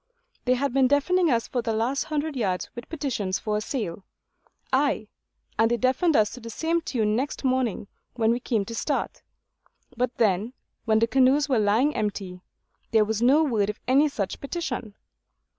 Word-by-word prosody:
They 255 0 +3
had 275 0 -1
been 265 -1 +4
deafening 335 +6 +2
us 230 -3 +1
for 245 - -1
the 225 -1 -2
last 235 +6 0
hundred 305 -1 -2
yards 190 -7 -1
with 240 -1 -9
petitions 255 -12 -2
for 210 -1 -2
a - - -2
sail; 205 -7 -4 0.7
ay, 265 -6 +1 0.5
and 225 0 +4
they 240 - +1
deafened 260 - +2
us 210 -3 +3
to 255 - -8
the 230 -1 -9
same 330 +8 0
tune 215 -8 0
next 270 +5 -2
morning 255 -6 0 0.3
when 225 -2 +2
we 240 - 0
came 225 -4 -1
to 230 - -7
start; 230 - -2 0.7
but 245 +1 -1
then, 215 +2 +1 0.3
when 220 -2 +3
the 225 - +4
canoes 265 +4 +3
were 260 -5 +2
lying 220 +8 +2
empty, 195 -3 -3 0.5
there 220 -2 +4
was 220 +1 -2
no 275 +6 +5
word 220 -8 +1
of 210 - -5
any 280 +4 +4
such 200 -8 -4
petition. 265 - -4
240 Hz, 180 wpm, -25 LUFS, 215-275 Hz, 0.7 s, no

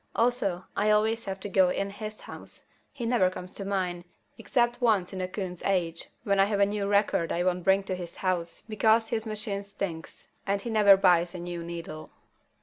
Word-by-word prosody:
Also, 225 -7 +1
I 215 - +2
always 220 +2 +2
have 195 -1 -4
to - - -4
go 190 -2 +4
to 195 +2 -1
his 215 +1 -7
house. - - -9 0.3
He 260 -5 -5
never 230 -6 +3
comes 185 0 -8
to 200 - -6
mine, 185 -3 -2 0.3
except 240 0 0
once 205 -6 +2
in 190 - -4
a 185 - -1
coon's 185 -2 -5
age 170 -4 0 0.2
when 200 -3 +1
I 195 - +6
have 205 0 -1
a 200 - +6
new 200 0 -2
record 200 -5 +2
I 175 - 0
won't 180 -1 0
bring 195 +2 +4
to 190 - -3
his 175 -2 -7
house 175 -3 -2
because 220 +1 +3
his 225 -1 -2
machine 210 -2 -3
stinks 200 -5 -6 0.2
and 200 0 +1
he 230 +3 -5
never 205 -3 +7
buys 175 -2 +3
a - - -5
new 175 -1 -5
needle. 165 -2 -7
195 Hz, 205 wpm, -28 LUFS, 180-215 Hz, 0.3 s, never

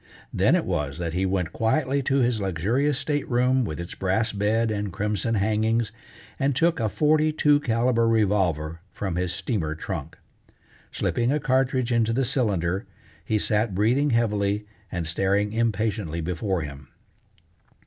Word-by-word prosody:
Then - - +3
it - - 0
was 75 -6 -2
that 85 -2 -3
he 95 +2 0
went 90 -4 -1
quietly 135 +4 +1
to 135 0 +1
his 120 -3 +1
luxurious 110 - 0
state 145 0 -2
room 125 +1 +2
with 80 -8 -4
its 85 +1 -6
brass 95 +4 0
bed 110 +3 +1
and 105 -2 -2
crimson 105 +4 -1
hangings, 110 +2 +1 0.5
and 135 -1 +1
took 165 +2 +2
a 110 -2 +1
forty 155 +4 +2
two 150 -1 +3
caliber 115 -2 +1
revolver 95 -8 +1
from 95 -4 -4
his 90 0 -1
steamer 85 - -2
trunk. 80 - -6 0.7
Slipping 120 +1 0
a 150 - +1
cartridge 130 -2 +1
into 115 -1 +2
the 135 +2 +1
cylinder, 100 - 0 0.4
he 110 - 0
sat 105 -1 0
breathing 125 +9 +2
heavily 105 -3 +1 0.3
and 85 -3 -3
staring 100 +5 0
impatiently 110 -6 -1
before 90 +1 -2
him. 70 -2 -9
110 Hz, 150 wpm, -25 LUFS, 95-125 Hz, 0.7 s, Then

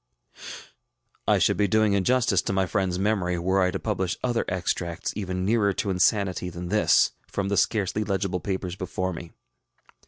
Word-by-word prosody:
ŌĆØ - - -10 0.6
I - - +4
should - - +2
be 105 - +2
doing 110 +1 +3
injustice 120 +6 +2
to - - -3
my 95 0 +2
friendŌĆÖs 95 -1 -1
memory, 95 -3 0
were 95 +3 +1
I 90 - +3
to - - -2
publish 95 -5 -2
other 120 -2 0
extracts 85 -2 -2
even 95 -2 -3
nearer 105 -1 +2
to 100 -2 -2
insanity 90 -1 +1
than 85 0 -7
this, 85 -6 +4 0.2
front 100 -1 -3
the 100 - +1
scarcely 105 +1 +1
legible 95 -2 -1
papers 95 -1 -3
before 95 0 -3
me. 85 0 -8
95 Hz, 175 wpm, -25 LUFS, 90-105 Hz, 0.6 s, I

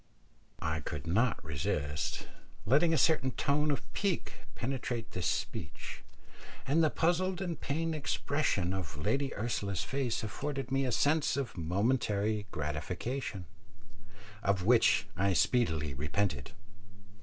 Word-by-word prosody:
I 80 0 0
could 75 0 -5
not 105 +6 +2
resist 75 0 -2 0.4
letting 150 +9 +4
a 160 - +3
certain 145 -3 +4
tone 145 +4 +1
of 145 - 0
pique 195 -4 -1 0.2
penetrate 120 -3 -3
this 90 - -1
speech, 80 +1 -3 0.6
and 160 +5 +3
the 155 - +5
puzzled 175 +3 +1
and 175 -4 -3
pained 165 +3 -1
expression 140 - 0
of 90 -7 -4
Lady 135 - 0
Ursula's 100 -4 -1
face 130 -4 -1
afforded 135 +4 -3
me 135 0 +2
a 125 - 0
sense 145 +5 +2
of 135 -4 -2
momentary 105 +3 +1
gratification, 90 - -3 1.0
of 100 -3 +1
which 115 -2 +5
I 100 +1 +2
speedily 80 - +2
repented. 90 +8 -1
115 Hz, 120 wpm, -32 LUFS, 90-140 Hz, 1.0 s, the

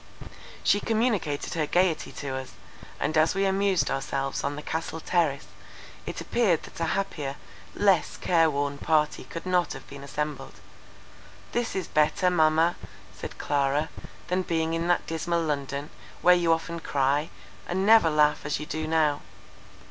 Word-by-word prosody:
She 205 - +4
communicated 215 - 0
her 155 -3 0
gaiety 180 -1 +1
to 140 - -5
us, 130 -1 -5 0.5
and 155 - -1
as 155 +3 +3
we 195 0 +2
amused 195 -1 +2
ourselves 135 0 -2
on 140 +1 -1
the 150 - -7
Castle 160 0 -3
Terrace, 160 -5 0 0.6
it - - -4
appeared 205 -9 +1
that - - -11
a 165 - +1
happier, 150 -8 -3 0.4
less 195 -3 +2
care 165 -2 +3
worn 140 -1 -2
party 155 -1 +1
could 165 - -7
not 180 -1 +1
have - - -10
been 140 0 -10
assembled. 150 +1 -5 0.9
"This 240 -1 -1
is 190 -3 -2
better, 155 +4 +2
Mamma," 160 0 +3 0.4
said - - -8
Clara, 145 +2 0 0.4
"than 180 +1 +1
being 165 -2 -1
in 165 +1 -1
that 175 - +2
dismal 165 +1 -1
London, 140 -1 -3 0.3
where 180 - +8
you 175 -2 +2
often 165 +1 -1
cry, 145 0 0 0.4
and 190 +2 0
never 220 -5 +7
laugh 150 -1 +3
as 145 - -2
you 150 - -5
do 155 +1 -4
now." 155 -2 +2
160 Hz, 155 wpm, -27 LUFS, 145-180 Hz, 0.9 s, where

